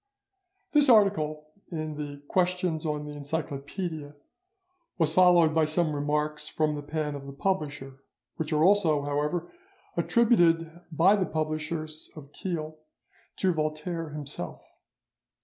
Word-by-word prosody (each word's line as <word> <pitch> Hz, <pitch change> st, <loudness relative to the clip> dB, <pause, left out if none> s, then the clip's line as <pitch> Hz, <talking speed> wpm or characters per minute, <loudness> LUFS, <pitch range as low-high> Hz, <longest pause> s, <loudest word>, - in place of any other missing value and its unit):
This 295 Hz, -2 st, +5 dB
article 155 Hz, -9 st, +3 dB, 0.2 s
in 155 Hz, -2 st, -3 dB
the 145 Hz, -1 st, -7 dB
'Questions 180 Hz, -3 st, 0 dB
on 150 Hz, -1 st, -2 dB
the 150 Hz, -, -6 dB
Encyclopaedia' 145 Hz, +1 st, -4 dB, 0.8 s
was 160 Hz, -3 st, +2 dB
followed 175 Hz, -3 st, +6 dB
by 160 Hz, 0 st, +3 dB
some 155 Hz, 0 st, 0 dB
remarks 150 Hz, +1 st, -1 dB
from 155 Hz, -1 st, 0 dB
the 145 Hz, -, -4 dB
pen 150 Hz, 0 st, -3 dB
of 140 Hz, -1 st, -7 dB
the -, -, -6 dB
publisher, 140 Hz, -5 st, -3 dB, 0.4 s
which 160 Hz, 0 st, -3 dB
are 155 Hz, 0 st, +3 dB
also, 170 Hz, -6 st, +4 dB
however, 150 Hz, +4 st, -1 dB, 0.4 s
attributed 170 Hz, -8 st, +3 dB
by 175 Hz, +6 st, +5 dB
the 190 Hz, -3 st, 0 dB
publishers 155 Hz, 0 st, -3 dB
of 145 Hz, -2 st, -11 dB
Kelh 155 Hz, -4 st, -4 dB, 0.6 s
to 185 Hz, -2 st, +1 dB
Voltaire 155 Hz, +1 st, -3 dB
himself. 145 Hz, -, -6 dB
155 Hz, 125 wpm, -28 LUFS, 150-175 Hz, 0.8 s, followed